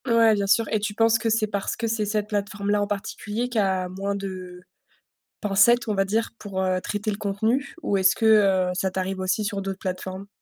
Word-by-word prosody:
Ouais, 230 -2 +5
bien 200 -1 0
sûr 215 +2 +3
et 215 - +2
tu 205 0 -3
penses 225 0 +3
que 225 - 0
c'est 220 0 +2
parce 200 -2 -3
que 230 - -3
c'est 225 -1 0
cette 210 0 -1
plateforme-là, 205 0 -1
en 205 - 0
particulier, 210 +3 -3
qui 240 -3 0
a 190 -2 +1
moins 195 +2 -3
de 185 -2 -7 0.8
pincettes, 230 +5 +4
on 210 - 0
va 195 0 +2
dire, 220 +4 0
pour, 195 -3 -4
heu, 185 -1 +1
traiter 205 +3 -3
le 205 - -2
contenu 220 +6 -1
ou 200 - 0
est-ce 190 0 +4
que, 200 -4 +4
heu, - - -1
ça 190 +1 -1
t'arrive 190 0 -3
aussi 185 +3 0
sur 200 -2 -3
d'autres 195 0 -4
plateformes? 185 +1 -5
205 Hz, 220 wpm, -24 LUFS, 190-220 Hz, 0.8 s, Ouais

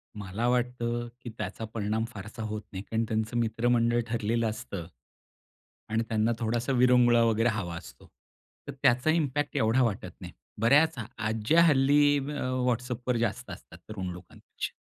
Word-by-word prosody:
मला 105 +3 -3
वाटतं, 120 -1 -1
की 120 - -7
त्याचा 110 - -5
परिणाम 110 +1 -1
फारसा 105 +3 -8
होत 110 0 -4
नाही, 95 0 -6
कारण 115 +1 -1
त्यांचं 110 +1 -1
मित्रमंडळ 120 +1 +2
ठरलेलं 115 0 0
असतं. 100 -5 -6 1.0
आणि 110 +1 0
त्यांना 110 +1 +1
थोडासा 120 +3 -1
विरंगुळा 125 -1 +5
वगैरे 115 +1 +2
हवा 95 -6 -3
असतो. - - -13 0.6
तर - - -5
त्याचा 125 +5 +4
इम्पॅक्ट 145 -2 0
एवढा 115 +4 +3
वाटत 105 -5 -2
नाही. - - -8 0.3
बऱ्याच 150 +7 +5 0.2
आज्ज्या 110 +9 +2
हल्ली 145 -1 +4
अ, 145 +1 -4 0.3
WhatsAppवर 125 0 -1
जास्त 115 -3 -2
असतात 80 - -11
तरुण 95 -4 -5
लोकांपेक्षा. 90 0 -8
115 Hz, 140 wpm, -28 LUFS, 110-125 Hz, 1.0 s, विरंगुळा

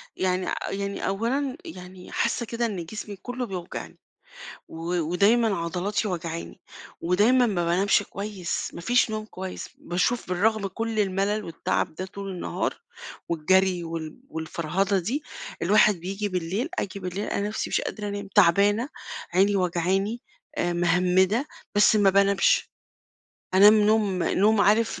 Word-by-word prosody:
يعني 185 -1 0 0.2
يعني 200 0 -3
أولًا 255 +8 -1
يعني 180 - -10
حاسّة 235 - 0
كده 235 +1 -2
إن 190 -7 -3
جسمي 210 +2 -7
كلّه 245 +5 -5
بيوجعني، 185 -4 -7 0.7
و - - -12 0.3
ودايمًا 200 +6 +3
عضلاتي 180 +6 -2
واجعاني، 170 -2 -5 0.4
ودايمًا 215 +9 +4
ما 180 -5 0
بانامش 190 +4 +3
كويس، 200 -3 -4
ما - - -7
فيش 240 +5 +2
نوم 215 0 -3
كويس، 190 -3 -7
باشوف 185 +7 -1
بالرغم 205 +3 +1
كُلّ 225 +3 -2
الملل 200 +2 0
والتعب 165 -1 -2
ده 185 +4 -5
طول 200 +1 -7
النهار 180 -2 -3 0.5
والجري 180 +2 +2
وال 165 +3 -6
والفَرهَدة 175 +5 -1
دي، 245 - -2 0.4
الواحد 210 +3 +5
بييجي 195 +4 -3
بالليل 185 - -2
آجي 200 0 -3
بالليل 185 +2 -4
ألاقي - - -2
نَفسي 210 +2 -3
مش - - +2
قادرة 210 -1 -4
أنام، 200 0 -5
تعبانة، 205 - +4 0.5
عيني 200 +2 +4
وجعاني، 190 +5 0 0.4
آآ، 175 - +1
مهمّدة، 180 - +2 0.3
بس 210 +1 +5
ما 200 -2 +5
بانامش، 200 0 +3 0.8
أنام 205 +3 +8
نوم 210 -3 +2
نوم 210 +2 +3
عارف 220 +3 +3
195 Hz, 135 wpm, -25 LUFS, 180-215 Hz, 0.8 s, أنام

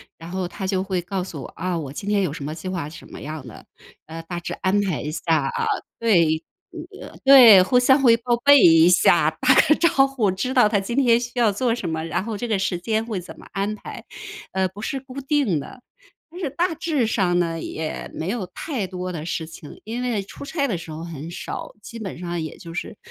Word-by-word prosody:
然 165 +1 -11
后 185 0 -3
他 190 +1 -5
就 190 -1 0
会 190 -2 -2
告 180 +1 -3
诉 160 -7 -7
我， - - -7
啊， 185 -1 -2
我 140 -4 -6
今 195 +8 -7
天 205 -1 +2
有 180 -7 0
什 145 -2 -6
么 150 - -4
计 170 +3 -6
划， 180 -5 -3
是 165 +3 -10
什 - - -16
么 - - -9
样 155 -1 -7
的， 110 - -12 0.4
呃， 165 +1 -8
大 175 +1 -5
致 170 - -5
安 190 +2 +1
排 190 -6 -2
一 150 - -4
下 160 - -6 0.2
啊。 - - -2 0.3
对 170 -8 +3 0.3
嗯， 340 0 -10
对， 240 -9 +9
互 250 +6 +3
相 265 +2 +5
会 240 -4 +6
报 240 0 0
备 285 -1 +8
一 165 0 +7
下， 180 - +4
打 - - +5
个 - - +4
招 290 -5 +3
呼， 255 -7 0
知 190 +8 -2
道 245 -5 +5
他 210 - +2
今 195 +5 -4
天 240 -4 +4
需 240 0 -5
要 230 -3 +4
做 230 +4 0
什 200 -7 -4
么， 160 0 -3
然 165 - -2
后 220 -1 -4
这 240 - -4
个 215 -4 0
时 190 -2 -1
间 220 +4 -1
会 215 -5 -3
怎 180 - -11
么 - - -13
安 200 +2 -1
排。 210 - -9 0.5
呃， 190 0 +1
不 200 +4 -11
是 270 - -2
固 265 0 -9
定 270 - +1
的。 250 - -10 0.5
但 355 - -10
是 310 - -1
大 340 +5 0
致 310 -5 0
上 190 -5 +1
呢， 165 -2 -1
也 160 0 -5
没 160 - -4
有 205 -3 -3
太 255 - -3
多 185 0 -5
的 160 -4 -5
事 160 -1 -3
情， 160 -2 -12
因 230 +3 -4
为 235 -5 -1
出 195 - -11
差 280 -2 -1
的 190 -9 -2
时 165 - -10
候 155 +1 -7
很 165 -2 -7
少， 175 - -7
基 230 - -9
本 200 -4 -6
上 175 -1 -4
也 155 - -6
就 165 -1 -10
是， 180 - -5
195 Hz, 260 characters per minute, -22 LUFS, 170-240 Hz, 0.5 s, 对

